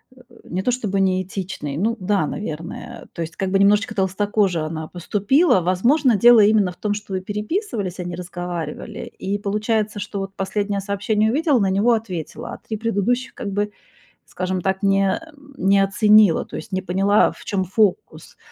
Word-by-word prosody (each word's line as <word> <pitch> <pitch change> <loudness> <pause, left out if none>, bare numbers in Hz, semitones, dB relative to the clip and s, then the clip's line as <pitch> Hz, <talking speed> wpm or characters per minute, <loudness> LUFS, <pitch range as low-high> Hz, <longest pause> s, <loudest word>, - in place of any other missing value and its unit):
э, 255 - -17 0.2
не 185 - -3
то 250 - +2
чтобы 210 -6 -1
не 185 -1 +2
этичный. 180 -6 -5
Ну 225 +6 0
да, 185 -4 +1
наверное. 210 +6 -6
То 170 - -6
есть 160 0 -5
как 190 -1 -2
бы 195 - +3
немножечко 210 +2 +3
толстокоже 195 -2 +1
она 155 0 -4
поступила. 205 - +2
Возможно, 235 - +3
дело 235 +3 +7
именно 205 -3 +4
в - - -15
том, 210 -1 -1
что 205 -1 -6
вы 185 - -1
переписывались, 210 - -3
а - - -2
не 175 -1 -5
разговаривали. 175 -1 -6 0.2
И 200 +2 -2
получается, 210 +1 -1
что 200 0 -5
вот 195 0 -6
последнее 200 +1 -2
сообщение 210 +2 0
увидела, 290 -2 +2
на 195 - +2
него 205 +5 +3
ответила, 185 -8 -4
а - - -7
3 220 - -6
предыдущих 230 +3 -1
как 200 - -5
бы, 205 +1 -1 0.5
скажем 185 0 -3
так, 190 +2 -1
не 195 -1 +2 0.4
не 195 +1 +3
оценила, 210 -2 +4
то - - -10
есть - - -7
не 190 0 -1
поняла, 195 +3 +3
в - - -14
чём 195 -2 -1
фокус. 195 +1 -1
200 Hz, 180 wpm, -21 LUFS, 185-215 Hz, 0.5 s, дело